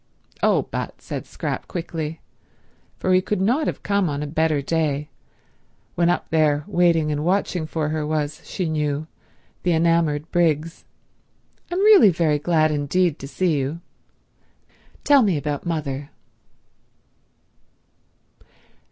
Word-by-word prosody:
"Oh, - - +3
but," - - -4
said - - -6
Scrap - - -4
quickly, 165 -3 -5 0.8
for 185 - +1
he 185 - +5
could 210 +1 -2
not 245 +11 +1
have - - -4
come 200 -3 +1
on 145 0 -3
a - - -3
better 155 0 +1
day, 150 0 -1 0.8
when 170 0 +2
up 175 - 0
there 150 -2 +2
waiting 165 -3 +2
and 150 0 -2
watching 180 -2 0
for 155 -1 -2
her 155 0 -2
was, 150 -1 -2
she 185 - -3
knew, 150 -1 -1 0.6
the 175 - +1
enamoured 165 -2 +1
Briggs, 165 -1 0 0.9
"I'm 360 +2 0
really 410 - +8
very 160 -4 +1
glad 155 0 +2
indeed 150 +3 0
to 135 - -7
see 170 +2 0
you. 140 +5 -3 1.2
Tell 285 -2 +6
me 195 -8 +2
about 145 +2 -3
mother." 145 -4 -3
160 Hz, 130 wpm, -22 LUFS, 150-175 Hz, 1.2 s, really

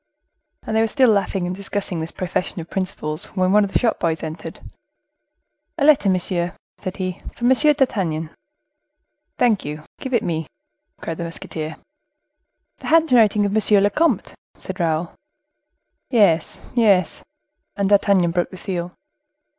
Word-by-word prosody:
And 220 - -3
they 220 - +4
were 225 - +3
still 255 +1 +4
laughing 195 -2 0
and 180 +1 -3
discussing 195 -2 -3
this 160 +1 -4
profession 180 0 -3
of 165 - -9
principles, 165 -4 -3
when 185 0 +2
one 210 +1 +5
of 200 - -3
the - - +3
shop 235 -3 0
boys 160 -2 -1
entered. 160 +1 -7 1.2
"A 285 - +1
letter, 285 -9 +5
monsieur," 180 -1 -1 0.2
said 185 - -5
he, 185 -1 -4
"for 240 - -3
M. 250 - +5
d'Artagnan." 220 - +2 1.1
"Thank 230 -5 +2
you; 150 +1 -6 0.2
give 260 -2 -2
it 230 - +1
me," 160 -4 -2 0.5
cried 165 - -5
the - - -2
musketeer. 160 -1 -6 1.0
"The - - -8
handwriting 245 -10 +4
of 200 - -1
monsieur 210 -1 +4
le 205 +1 +3
comte," 330 +9 +1 0.2
said - - -8
Raoul. 165 0 -1 1.0
"Yes, 200 - +2
yes." 200 -8 +3 0.5
And 200 -1 0
D'Artagnan 200 -4 +4
broke 175 0 0
the 185 - -10
seal. 180 -2 -4
190 Hz, 150 wpm, -21 LUFS, 170-220 Hz, 1.2 s, one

